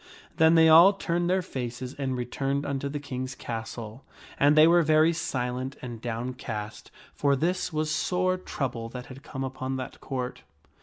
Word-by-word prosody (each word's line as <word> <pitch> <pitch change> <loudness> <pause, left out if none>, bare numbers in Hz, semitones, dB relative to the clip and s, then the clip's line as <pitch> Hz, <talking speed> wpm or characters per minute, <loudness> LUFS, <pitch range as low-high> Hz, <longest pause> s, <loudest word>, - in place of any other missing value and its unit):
] - - -27
Then 160 0 +6
they 160 0 +7
all 170 +5 +8
turned 175 -3 -1
their 185 0 +2
faces 125 -2 -5
and 135 -2 -3
returned 135 +3 -2
unto 140 0 -2
the 145 +1 -4
King's 130 -2 -5
castle; 115 0 -6 0.4
and 145 +2 +5
they 155 - +9
were 175 +1 +6
very 155 +1 +4
silent 130 -3 -3
and 120 -3 -7
downcast, 115 -3 -5 0.2
for 140 -1 +2
this 180 +6 -1
was 155 0 -1
sore 185 +4 +1
trouble 125 -9 -4
that 125 +1 -7
had 135 - -13
come 135 -1 -6
upon 130 0 -4
that 130 0 -6
Court. 125 -2 -4
135 Hz, 170 wpm, -27 LUFS, 125-160 Hz, 0.4 s, they